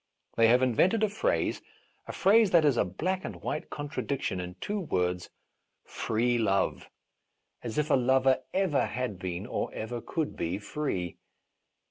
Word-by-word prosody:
They 115 0 +5
have 125 +3 +5
invented 180 - +3
a 215 - +3
phrase, - - 0 0.5
a - - -4
phrase 210 +2 +4
that 170 -4 +5
is 145 -4 +4
a - - +3
black 185 - -2
and - - -5
white 150 - -3
contradic 145 -2 -3
tion 95 - -1
in 90 0 -6
two 205 - -3
words 90 - -1 0.3
— - - -50 0.2
"free 120 +2 0
love" 100 -3 0 0.4
— - - -51
as 115 -2 -5
if 150 0 +1
a - - +6
lover 130 +1 +3
ever 185 -7 +1
had 125 -7 -3
been, 90 +1 -4
or - - -3
ever 120 +2 -4
could 160 +4 -3
be, 85 +3 -2
free. 105 - -3
125 Hz, 170 wpm, -29 LUFS, 100-160 Hz, 0.5 s, a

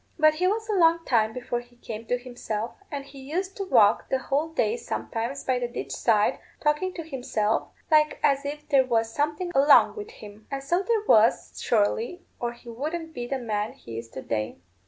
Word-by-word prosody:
But 310 -1 +5
he 360 +4 +1
was 440 +3 0
a 430 - 0
long 335 -3 +4
time 220 -3 +2
before 245 +1 -3
he 245 0 -16
came 225 -2 -8
to 245 - +1
himself; 240 -3 -4 0.2
and 280 -2 -4
he 275 0 -13
used 360 +8 -3
to 395 - -3
walk 210 - +4
the 265 - +2
whole 285 +4 -1
day 355 +7 +1
sometimes 260 - -4
by 255 -1 +1
the 245 - -1
ditch 240 - -6
side, 215 -3 +2 0.2
talking 300 +5 +1
to 330 - -5
himself, 245 -7 -1 0.2
like 305 0 +4
as 275 0 +3
if 295 +1 -6
there 275 -3 +5
was 225 -2 +1
someone 305 +6 -1
along 280 +2 +6
with 425 0 -7
him. 210 - -13
And 275 -1 -4
so 345 +7 +1
there 440 +1 +1
was, 220 +1 +4
surely, 235 - +1 0.2
or 240 0 -2
he 240 0 -18
wouldn't 315 +7 -4
be 240 -3 -5
the 270 - -1
man 215 -3 -2
he 115 -1 -8
is 115 0 -10
to 130 - -8
day." 110 -1 -2
270 Hz, 205 wpm, -26 LUFS, 230-320 Hz, 0.2 s, along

